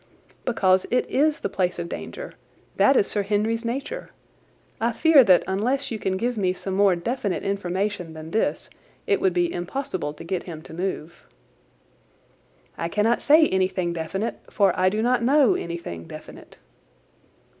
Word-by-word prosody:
"Because 190 Hz, -6 st, +2 dB
it 250 Hz, -, +1 dB
is 305 Hz, +3 st, +2 dB
the -, -, 0 dB
place 180 Hz, -2 st, -1 dB
of 170 Hz, -1 st, -4 dB
danger. -, -, -7 dB, 0.4 s
That 270 Hz, -1 st, +5 dB
is -, -, +4 dB
Sir 205 Hz, -, -1 dB
Henry's 215 Hz, +3 st, 0 dB
nature. 275 Hz, -, -4 dB, 0.7 s
I 235 Hz, +1 st, 0 dB
fear 310 Hz, +2 st, +6 dB
that 185 Hz, -5 st, +5 dB
unless 245 Hz, +9 st, -1 dB
you 220 Hz, -, -3 dB
can 190 Hz, -1 st, -1 dB
give 240 Hz, +3 st, -1 dB
me 185 Hz, -2 st, +1 dB
some 190 Hz, +1 st, -5 dB
more 195 Hz, -1 st, +4 dB
definite 205 Hz, +1 st, -2 dB
information 195 Hz, -2 st, -2 dB
than 160 Hz, 0 st, -9 dB
this 220 Hz, -, -1 dB, 0.3 s
it 410 Hz, -3 st, +1 dB
would 380 Hz, -1 st, +3 dB
be 350 Hz, -1 st, +1 dB
impossible 175 Hz, -, -4 dB
to -, -, -10 dB
get 180 Hz, +1 st, -2 dB
him 160 Hz, -2 st, -8 dB
to -, -, -12 dB
move." 175 Hz, -2 st, -5 dB, 1.5 s
"I 165 Hz, -, -2 dB
cannot 215 Hz, +5 st, +1 dB
say 310 Hz, +2 st, +6 dB
anything 185 Hz, -2 st, 0 dB
definite, 190 Hz, +7 st, -3 dB
for 195 Hz, -3 st, +3 dB
I 185 Hz, 0 st, +3 dB
do 215 Hz, +3 st, -1 dB
not 245 Hz, 0 st, +2 dB
know 270 Hz, +1 st, +4 dB
anything 170 Hz, -, -5 dB
definite." -, -, -12 dB
200 Hz, 160 wpm, -24 LUFS, 180-245 Hz, 1.5 s, fear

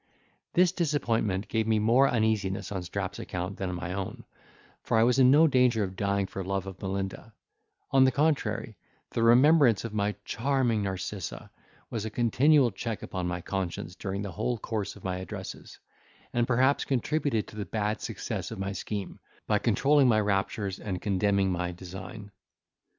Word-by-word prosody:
This 180 Hz, 0 st, +4 dB
disappointment 115 Hz, -, 0 dB
gave 110 Hz, -1 st, 0 dB
me 110 Hz, -1 st, +3 dB
more 120 Hz, +6 st, +4 dB
uneasiness 110 Hz, -5 st, 0 dB
on 95 Hz, -2 st, -2 dB
Strap's 100 Hz, +2 st, -4 dB
account 90 Hz, +2 st, -4 dB
than 95 Hz, -1 st, -3 dB
my 90 Hz, 0 st, -4 dB
own, 95 Hz, -1 st, -5 dB, 0.6 s
for -, -, 0 dB
I 110 Hz, -, +5 dB
was 125 Hz, +2 st, +3 dB
in 130 Hz, -1 st, +7 dB
no 150 Hz, +4 st, +7 dB
danger 125 Hz, -6 st, +3 dB
of 95 Hz, -1 st, -5 dB
dying 100 Hz, 0 st, 0 dB
for 95 Hz, 0 st, -6 dB
love 95 Hz, 0 st, -2 dB
of 95 Hz, -1 st, -9 dB
Melinda; 95 Hz, +3 st, -4 dB, 0.6 s
on 135 Hz, -1 st, +6 dB
the 130 Hz, -, +5 dB
contrary, 130 Hz, -7 st, 0 dB, 0.4 s
the 115 Hz, -, -1 dB
remembrance 120 Hz, -, +5 dB
of 115 Hz, -, -5 dB
my 105 Hz, 0 st, 0 dB
charming 120 Hz, -3 st, +1 dB
Narcissa 95 Hz, -2 st, -5 dB, 0.4 s
was 110 Hz, -3 st, -3 dB
a 110 Hz, -, -3 dB
continual 125 Hz, +4 st, +3 dB
check 115 Hz, +2 st, -5 dB
upon 90 Hz, -2 st, -3 dB
my 90 Hz, 0 st, -3 dB
conscience 90 Hz, -1 st, -4 dB
during 100 Hz, +2 st, -4 dB
the 100 Hz, -, -5 dB
whole 115 Hz, +6 st, -2 dB
course 105 Hz, -2 st, -4 dB
of 100 Hz, -, -15 dB
my 90 Hz, -1 st, -2 dB
addresses; 95 Hz, -, -8 dB, 0.6 s
and 120 Hz, 0 st, +1 dB
perhaps 130 Hz, +3 st, +3 dB
contributed 135 Hz, -2 st, 0 dB
to -, -, -13 dB
the 105 Hz, -1 st, -4 dB
bad 105 Hz, +3 st, -2 dB
success -, -, -4 dB
of -, -, -7 dB
my 95 Hz, 0 st, -3 dB
scheme, 100 Hz, 0 st, -5 dB, 0.3 s
by -, -, +2 dB
controlling 140 Hz, -1 st, +3 dB
my 110 Hz, -3 st, +4 dB
raptures 100 Hz, -1 st, -1 dB
and 95 Hz, -4 st, -4 dB
condemning 100 Hz, -1 st, +1 dB
my 90 Hz, 0 st, -2 dB
design. 95 Hz, +3 st, -9 dB
105 Hz, 170 wpm, -28 LUFS, 95-120 Hz, 0.6 s, in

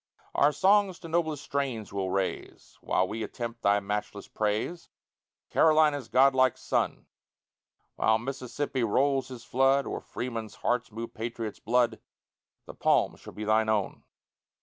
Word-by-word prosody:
Our 145 Hz, -, +4 dB
songs 190 Hz, +4 st, +3 dB
to 170 Hz, -, -8 dB
noblest 160 Hz, -3 st, -1 dB
strains 130 Hz, -8 st, -3 dB
we'll 95 Hz, -2 st, -2 dB
raise 95 Hz, 0 st, -4 dB
While 95 Hz, -, +1 dB
we 110 Hz, +3 st, -5 dB
attempt 115 Hz, 0 st, -5 dB
thy 100 Hz, -1 st, +3 dB
matchless 105 Hz, 0 st, -4 dB
praise, 110 Hz, +11 st, -2 dB, 0.6 s
Carolina's 155 Hz, -5 st, +4 dB
godlike 130 Hz, 0 st, +4 dB
son; -, -, -1 dB, 0.9 s
While 110 Hz, 0 st, +3 dB
Mississippi 130 Hz, +2 st, -3 dB
rolls 135 Hz, +5 st, +2 dB
his 125 Hz, -3 st, -9 dB
flood, 135 Hz, +2 st, +2 dB
Or -, -, -4 dB
Freemen's 115 Hz, -3 st, -5 dB
hearts 120 Hz, -1 st, -1 dB
move 115 Hz, +2 st, -6 dB
patriots' 115 Hz, -1 st, -5 dB
blood, 120 Hz, 0 st, +1 dB, 0.7 s
The -, -, -9 dB
palm -, -, +2 dB
shall -, -, -12 dB
be 105 Hz, -, -6 dB
thine 110 Hz, +1 st, +2 dB
own. 105 Hz, -3 st, 0 dB
120 Hz, 135 wpm, -28 LUFS, 110-140 Hz, 0.9 s, Our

